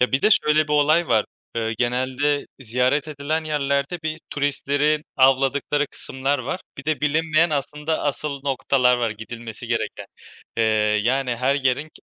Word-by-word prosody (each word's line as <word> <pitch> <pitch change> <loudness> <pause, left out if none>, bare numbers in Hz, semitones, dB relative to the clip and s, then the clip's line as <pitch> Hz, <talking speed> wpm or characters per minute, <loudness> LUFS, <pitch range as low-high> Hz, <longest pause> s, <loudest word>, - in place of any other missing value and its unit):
Ya, 125 +1 +2
bir 135 - +1
de 215 - +4
şöyle 155 -5 +4
bir - - -1
olay 155 +3 +3
var; 110 -3 +3 0.3
eee 110 -1 -1
genelde 130 +4 0
ziyaret 125 +5 +1
edilen 155 +2 -2
yerlerde 145 +2 -1
bir 155 +1 -3
turistleri 145 +1 0
avladıkları 135 +2 +3
kısımlar 135 +1 -2
var. 135 +9 -4 0.2
Bir 135 - -7
de 155 -1 -1
bilinmeyen 155 +2 +2
aslında 150 +2 -2
asıl 145 -1 -2
noktalar 130 -2 +2
var, 120 -2 0
gidilmesi 110 +1 -7
gereken. - - -3 0.5
Eee, 115 - +2 0.4
yani 125 0 0
her 130 +3 +1
yerin 135 +1 +1
ke - - -17
140 Hz, 155 wpm, -22 LUFS, 130-150 Hz, 0.5 s, de